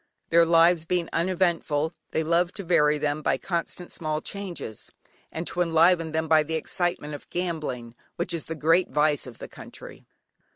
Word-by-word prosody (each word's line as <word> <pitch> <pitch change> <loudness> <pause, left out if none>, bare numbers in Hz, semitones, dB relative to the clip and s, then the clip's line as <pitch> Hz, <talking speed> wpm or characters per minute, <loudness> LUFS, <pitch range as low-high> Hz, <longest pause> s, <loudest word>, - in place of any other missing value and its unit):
Their 170 0 +6
lives 165 0 +5
being 175 -1 0
uneventful 170 -3 0 0.2
they 160 - -1
love 170 +2 +2
to 200 - -6
vary 150 -4 +3
them 150 0 -1
by - - +1
constant 175 0 -4
small 155 -2 -2
changes, 180 - -6 0.4
and 165 - -4
to 180 - -2
enliven 165 0 +4
them 160 +1 -1
by 160 0 +5
the 160 +2 -3
excitement 175 -2 -2
of 145 - -9
gambling, 155 -10 -3 0.2
which 170 - -2
is 165 - -3
the 160 - -5
great 165 +4 +3
vice 150 -2 +1
of 120 - -10
the - - -8
country. - - -11
165 Hz, 170 wpm, -26 LUFS, 155-175 Hz, 0.4 s, Their